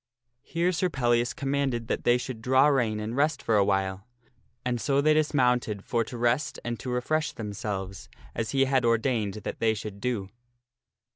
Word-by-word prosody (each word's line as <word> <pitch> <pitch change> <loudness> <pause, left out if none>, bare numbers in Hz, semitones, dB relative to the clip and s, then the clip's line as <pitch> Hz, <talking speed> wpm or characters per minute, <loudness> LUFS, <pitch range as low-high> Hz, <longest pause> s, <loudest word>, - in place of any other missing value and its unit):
Here 170 +2 0
Sir 185 +1 0
Pellias 120 -4 +1
commanded 135 -4 -1
that - - -2
they 120 0 +5
should 125 -2 -6
draw 130 +3 +4
rein 120 -7 +2
and 110 +2 -4
rest 145 0 +1
for 115 - +2
a 100 - +5
while, 95 +1 -1 0.6
and 120 -2 -1
so 140 -1 +2
they 155 +2 +4
dismounted 125 -9 +1
for 115 -1 +1
to 120 - -7
rest 120 +4 +1
and 120 -1 -3
to 130 - -5
refresh 155 +6 0
themselves, 100 -3 -5 0.2
as 110 - -3
he 135 -1 +3
had 130 -1 +2
ordained 115 -3 +1
that - - -5
they 110 -1 +2
should 100 -1 -7
do. 115 -6 -2
120 Hz, 175 wpm, -27 LUFS, 110-135 Hz, 0.6 s, they